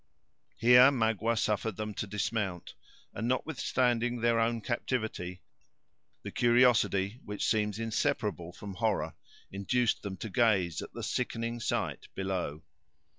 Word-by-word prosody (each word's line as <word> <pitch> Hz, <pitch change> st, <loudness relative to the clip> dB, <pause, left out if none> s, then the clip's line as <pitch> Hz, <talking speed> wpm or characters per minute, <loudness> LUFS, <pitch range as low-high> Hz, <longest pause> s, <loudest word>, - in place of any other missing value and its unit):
Here 125 Hz, +3 st, +8 dB
Magua 115 Hz, -3 st, +1 dB
suffered 110 Hz, 0 st, 0 dB
them 110 Hz, +1 st, -4 dB
to 105 Hz, -, -4 dB
dismount; 100 Hz, -2 st, -2 dB, 0.4 s
and 110 Hz, +3 st, -3 dB
notwithstanding 125 Hz, -3 st, 0 dB
their 115 Hz, 0 st, +2 dB
own 115 Hz, +1 st, +1 dB
captivity, 110 Hz, -7 st, -3 dB, 0.8 s
the -, -, -6 dB
curiosity 120 Hz, -3 st, +3 dB
which 105 Hz, -1 st, -3 dB
seems 105 Hz, -2 st, +1 dB
inseparable 105 Hz, -5 st, -1 dB
from 100 Hz, +2 st, -8 dB
horror, 105 Hz, +2 st, -1 dB, 0.4 s
induced 110 Hz, +5 st, 0 dB
them 95 Hz, -2 st, -6 dB
to 110 Hz, -, -6 dB
gaze 100 Hz, -, +2 dB
at -, -, -8 dB
the -, -, -6 dB
sickening 115 Hz, -1 st, -2 dB
sight -, -, -2 dB
below. 90 Hz, -5 st, -3 dB
110 Hz, 125 wpm, -30 LUFS, 100-120 Hz, 0.8 s, Here